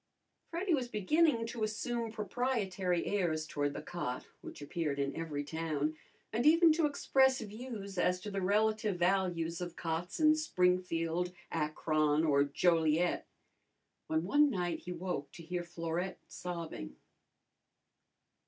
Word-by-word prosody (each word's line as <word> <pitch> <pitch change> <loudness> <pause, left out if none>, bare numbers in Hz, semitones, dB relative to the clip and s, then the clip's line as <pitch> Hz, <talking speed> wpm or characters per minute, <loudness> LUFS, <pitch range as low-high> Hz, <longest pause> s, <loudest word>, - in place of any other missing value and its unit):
Freddy 350 +2 0
was 260 -5 +1
beginning 240 - +2
to 230 0 -6
assume 225 +2 -2
proprietary 200 -5 -1
airs 170 -6 0
toward 145 -2 -1
the - - -6
cot, 150 -8 -4 0.2
which - - -9
appeared 145 0 -2
in 140 0 -1
every 155 -3 -3
town, 155 0 -2 0.4
and 230 +2 +1
even 330 +1 +7
to 315 -1 +3
express 265 -2 +3
views 210 -3 -6
as 180 0 +2
to 205 +3 -6
the 195 -1 -2
relative 215 +1 +2
values 175 -2 +1
of 175 -1 -5
cots 165 - -3
in 310 -1 +6
Springfield, 180 - +1 0.2
Akron, 155 -1 +1
or 140 -2 +4
Joliet 165 +3 +2 0.8
when 160 0 +1
one 290 +10 +4
night 175 -7 -1
he 180 - -7
woke 175 -4 -4
to 170 - -10
hear 175 +2 -3
Florette 170 +1 -3
sobbing. 165 - -6
180 Hz, 135 wpm, -33 LUFS, 160-220 Hz, 0.8 s, even